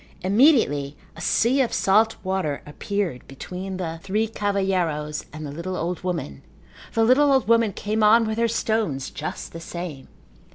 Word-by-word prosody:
Immediately 185 - +3 0.2
a - - -10
sea 255 +4 +2
of 245 - 0
salt 220 +3 +3
water 185 -7 -2
appeared 185 - -3
between 185 +7 -6
the 165 -3 -4
three 210 +4 0
cavalheiros 185 -8 -1
and 155 +1 -7
the 145 - -6
little 170 +5 -5
old 175 +1 -3
woman. 165 - -3 0.5
The 225 - +3
little 270 +5 +5
old 265 -4 +3
woman 230 -2 +4
came 215 +3 -2
on 225 +2 +6
with 220 +1 -2
her 235 - +3
stones 220 -12 -1
just 155 - -6
the 165 - -6
same. 165 -5 -7
190 Hz, 160 wpm, -24 LUFS, 160-220 Hz, 0.5 s, on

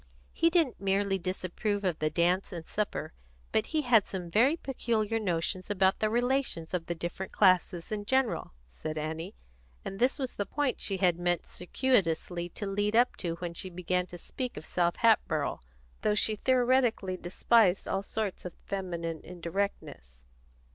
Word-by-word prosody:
"He 330 - +3
didn't 330 - +1
merely 195 0 +1
disapprove 185 +3 -2
of 180 -4 0
the 155 - +1
dance 180 +4 +1
and 170 -3 -6
supper, 210 - -3 0.4
but 220 - +1
he 310 -1 0
had 235 -5 +4
some 180 -3 -5
very 260 - +4
peculiar 225 -6 -1
notions 185 -1 -1
about 190 -1 +2
the 215 - +2
relations 245 -8 0
of 170 -2 -2
the 170 - -2
different 175 +3 -5
classes 180 -1 +3
in 205 -1 -3
general," 235 - 0
said 155 - -6
Annie; 160 - -4 0.5
and 195 - -5
this 255 +4 +3
was 265 -3 -2
the 205 - -2
point 290 +1 -1
she 195 - -2
had 180 -3 +2
meant 175 -1 0
circuitously 175 -5 0
to 205 - -6
lead 205 +2 0
up 240 +2 +4
to 170 -3 -2
when 170 0 -5
she 185 +2 -5
began 180 0 -1
to 175 - -9
speak 250 +8 -5
of 155 - -7
South 175 -1 +1
Hatboro', 190 -10 +2 0.4
though 210 - +2
she 215 +1 +3
theoretically 245 -5 +2
despised 190 +2 +2
all 195 - 0
sorts 205 -1 -3
of 180 - -7
feminine 170 -4 -3
indirectness. 170 - -5
190 Hz, 165 wpm, -30 LUFS, 175-225 Hz, 0.5 s, had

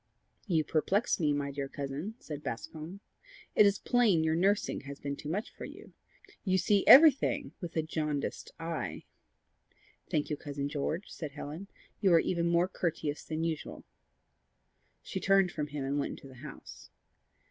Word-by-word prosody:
"You 165 -5 +2
perplex 195 +11 +1
me, 150 -3 +2
my 145 -1 -1
dear 140 0 -3
cousin," 145 +11 -5
said 150 - -7
Bascombe. 155 - -6 0.5
"It 210 - +7
is 200 0 +2
plain 225 -10 +3
your 160 0 +2
nursing 195 +5 +1
has 140 0 -9
been 140 0 -3
too 145 - -7
much 200 +7 -3
for - - -8
you. - - -12 0.5
You 185 -2 +2
see 200 +1 +3
everything 290 -1 +7
with 175 -2 -6
a 160 - +2
jaundiced 150 -2 -3
eye." 165 - -4 1.1
"Thank 150 0 0
you, 150 - -1
Cousin 140 -1 -4
George," 155 +6 -3
said 155 -4 -6
Helen. 150 +6 -7 0.3
"You 195 -4 +4
are - - +7
even 170 0 0
more 170 +1 +3
courteous 160 -5 -2
than 160 0 -3
usual." 165 -2 -4 1.2
She - - -4
turned 195 -2 +4
from 150 -3 -3
him 145 -2 -4
and 140 +2 0
went - - -2
into - - -12
the 130 -2 -13
house. - - -10
160 Hz, 165 wpm, -31 LUFS, 145-190 Hz, 1.2 s, It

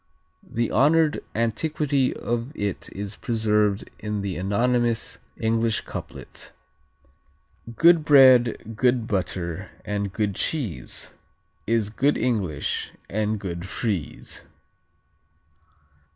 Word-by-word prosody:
The 115 0 -2
honored 155 +5 +3
antiquity 140 +4 +1
of 120 +2 -3
it 100 -2 -3
is 100 +1 -5
preserved 105 -3 +1
in 105 -1 -3
the 100 -2 -3
anonymous 115 +5 0 0.2
English 115 0 +1
couplet: - - -9 1.2
Good 170 +1 +6
bread, 125 -6 +5
good 125 0 +2
butter 90 -5 -3 0.2
and 100 -1 -2
good 105 0 -1
cheese 120 - -3 0.5
Is 110 -2 +1
good 140 +6 +2
English 95 - -1 0.2
and 110 +1 0
good 90 -2 -5
Friese. 95 - -4
110 Hz, 95 wpm, -24 LUFS, 100-125 Hz, 1.2 s, Good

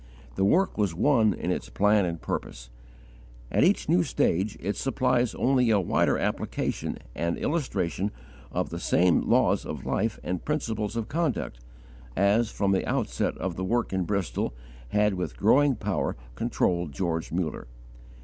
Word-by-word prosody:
The 95 - 0
work 170 - +2
was 100 -5 +1
one 115 - +4
in 90 - -2
its 65 -8 -3
plan 105 0 +3
and 85 -2 -3
purpose. - - -5 0.8
At - - +3
each - - +3
new 90 - +4
stage 95 +4 0
it 100 +1 -2
supplies 125 -1 +1
only 125 -2 +2
a 105 -2 +4
wider 90 - +2
application - - -2 0.2
and 85 0 -1
illustration 105 - -1 0.4
of - - -2
the - - -4
same 90 0 +3
laws - - +3
of - - -6
life 110 -1 -1
and 90 -1 -3
principles 110 -8 -2
of 115 -2 -2
conduct, 150 - -2 0.6
as, 105 +4 +3
from 100 -2 0
the 95 - +2
outset - - -1
of 90 -3 -3
the 95 - -2
work 115 +2 0
in 95 -1 0
Bristol, 100 -9 -2 0.3
had 105 +4 +2
with 90 -1 -4
growing 135 +6 +4
power 105 -2 -1 0.2
controlled 85 +5 0
George 80 -2 -2
Muller. 80 -6 -2
100 Hz, 155 wpm, -27 LUFS, 90-115 Hz, 0.8 s, one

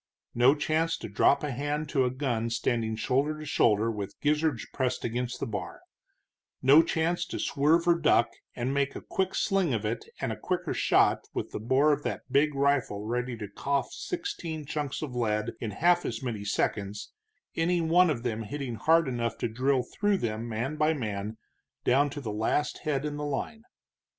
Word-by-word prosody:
No 125 +4 +5
chance 160 +2 0
to - - -7
drop 140 +7 +3
a 150 - -1
hand 145 +4 -2
to 135 -5 +2
a - - +2
gun 125 -3 -1
standing 115 -1 0
shoulder 135 +7 0
to 155 - -8
shoulder 115 -5 +3
with 100 -2 -6
gizzards 150 -4 +1
pressed 130 -1 -1
against 120 +1 -2
the - - -2
bar; 105 -3 -5 0.8
no 140 +4 +7
chance 165 +2 0
to - - -5
swerve 160 +5 +2
or 170 - +7
duck 135 -7 +4 0.3
and 125 +2 -1
make 140 0 0
a - - -6
quick 190 0 -1
sling 190 - +1
of 110 -1 -3
it 110 +2 -2 0.2
and - - -1
a - - -3
quicker - - -2
shot, - - +3
with - - -3
the - - -4
bore 130 +7 +3
of 145 - -2
that 120 -8 -3
big 145 +2 +3
rifle 135 -7 +1
ready 120 +1 -2
to 105 -2 -6
cough 140 +6 -2
sixteen 175 - -4
chunks 150 0 -3
of 130 -5 -5
lead 110 -2 0
in 115 - -3
half 175 - +3
as 115 +2 -4
many 115 -5 -3
seconds, 100 0 -2 0.4
any 175 +2 +2
one 170 +2 +4
of 125 -6 -2
them 115 -3 -2
hitting 120 +1 -5
hard 165 +2 +4
enough 120 -2 -2
to - - -1
drill 130 +3 +1
through 205 - 0
them, 115 - -3
man 120 +7 -3
by 155 +1 +2
man, 105 -4 -4 0.5
down 140 +3 +3
to 145 - -6
the 110 -7 -4
last 110 +7 0
head 145 -2 -1
in 145 -1 -3
the 150 - -4
line. 145 +10 -3
135 Hz, 190 wpm, -28 LUFS, 115-150 Hz, 0.8 s, no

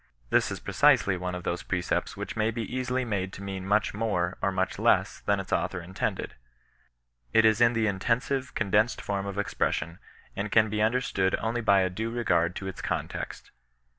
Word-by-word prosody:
This - - +3
is - - -5
precisely 100 - +3
one 90 0 -3
of 90 - -6
those 90 0 -2
precepts 90 -2 -2
which - - -5
may 110 0 +1
be 115 0 -3
easily 130 +1 -2
made 100 -4 -2
to 100 - -8
mean 95 -1 -5
m^ich 105 +1 +2
more, 100 -5 -1
or 100 - +1
much 95 0 -1
less, - - +2
thaji 100 -1 +2
its 95 - -6
author 95 - 0
intended. 90 +2 -3 1.0
It 110 - +6
is 110 +1 +4
in 120 0 +6
the 115 -1 +1
irUensive, 120 +6 -1
con 105 -4 -1
densed 105 +4 +3
form 100 -1 -3
of 100 0 -5
expression, 85 -4 -1 0.4
and 100 +1 -3
can 110 -2 +4
be 105 0 0
understood 110 -4 +1
only 115 +2 -2
by 100 -3 +4
a 95 - +1
due 110 +5 -3
regard 90 -8 +1
to 95 - -5
its 95 - -6
context. - - -4
100 Hz, 195 wpm, -28 LUFS, 95-115 Hz, 1.0 s, It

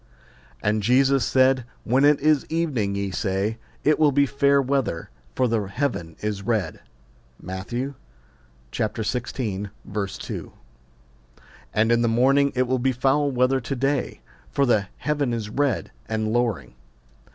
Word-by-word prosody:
And 105 +1 +1
Jesus 135 +4 +3
said, 130 -1 +3 0.2
When 130 +5 +3
it 145 0 +5
is 150 -1 +3
evening, 140 -12 0
ye 100 -1 -2
say, 100 +3 -1 0.2
It 155 +1 +3
will 150 -2 +5
be 140 +1 +4
fair 140 +1 +3
weather: 135 -10 -1 0.2
for 125 - +2
the 110 -4 0
heaven 100 - -3
is 105 -2 -2
red. 110 -1 -1 0.6
Matt. 95 +2 -6
xvi. 130 +4 -3 2.2
2. - - -7 1.2
And 110 +2 +3
in 120 0 +4
the 120 - +2
morning, 135 +5 +3
It 130 - +3
will 130 0 0
be 130 +2 +2
foul 135 +3 +2
weather 130 0 +2
to 130 +4 -3
day: 135 +1 -1 0.3
for 140 - +1
the 105 -6 +2
heaven 145 -3 -1
is 110 -3 -4
red 140 0 0 0.2
and 110 0 -1
lowring. 120 - -1
125 Hz, 140 wpm, -24 LUFS, 110-140 Hz, 2.2 s, it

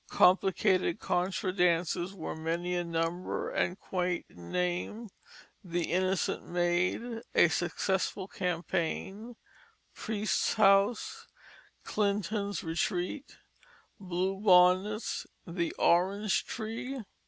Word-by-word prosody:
Complicated 185 -1 +3
contra 185 +1 -1
dances 175 0 +1
were 170 - -5
many 165 +3 -2
in 175 -1 -2
number 165 +2 -2
and 180 +3 -1
quaint 180 -2 -2
in 85 -1 -12
name: 180 +5 -2 0.5
The 175 -2 -2
Innocent 185 +2 0
Maid, 175 +7 0
A 175 - +6
Successful 185 +3 -1
Campaign, 190 +5 -3 0.6
Priest's 215 -1 -1
House, 200 +2 +3 0.6
Clinton's 205 -1 -1
Retreat, 180 - -2 0.6
Blue 190 0 -2
Bonnets, 190 +2 +4 0.2
The 170 0 -2
Orange 190 +4 +2
Tree. 230 +3 -5
185 Hz, 90 wpm, -30 LUFS, 175-200 Hz, 0.6 s, A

